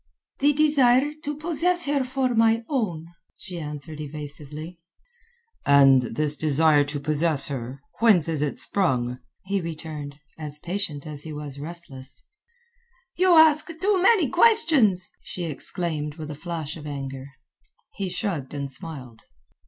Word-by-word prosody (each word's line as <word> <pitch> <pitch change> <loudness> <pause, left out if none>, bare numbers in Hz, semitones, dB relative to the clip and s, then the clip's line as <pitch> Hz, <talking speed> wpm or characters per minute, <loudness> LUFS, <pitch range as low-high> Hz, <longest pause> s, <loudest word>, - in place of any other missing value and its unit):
"The 285 +1 +4
desire 290 -2 +3
to 295 -1 -4
possess 345 +3 +2
her 280 -1 +1
for 255 0 -1
my 225 0 +3
own," 200 - -2 0.3
she 180 -3 -7
answered 150 0 -6
evasively. 150 +2 -7 0.8
"And 135 -2 +6
this 145 +5 -1
desire 155 0 +3
to 145 0 -4
possess 150 0 0
her, 130 0 -6 0.2
whence 215 -9 +5
is 160 -3 -1
it 150 -2 -1
sprung?" 125 -10 0 0.3
he 195 0 -1
returned, 155 -3 -7 0.2
as 150 -1 -4
patient 170 -3 -4
as 150 -2 -5
he 160 - -4
was 145 -2 -7
relentless. 140 -5 -9 0.9
"You 365 -1 +4
ask 310 -1 +6
too 385 0 +2
many 385 -5 +4
questions," 310 - +4
she 180 - -6
exclaimed 155 -1 -2
with 155 -2 -7
a 145 - -10
flash 165 -3 -4
of 150 -1 -9
anger. 135 -2 -6 0.7
He 195 -2 -4
shrugged 175 - -3
and 140 -1 -4
smiled. 130 -5 -7
160 Hz, 135 wpm, -24 LUFS, 145-230 Hz, 0.9 s, And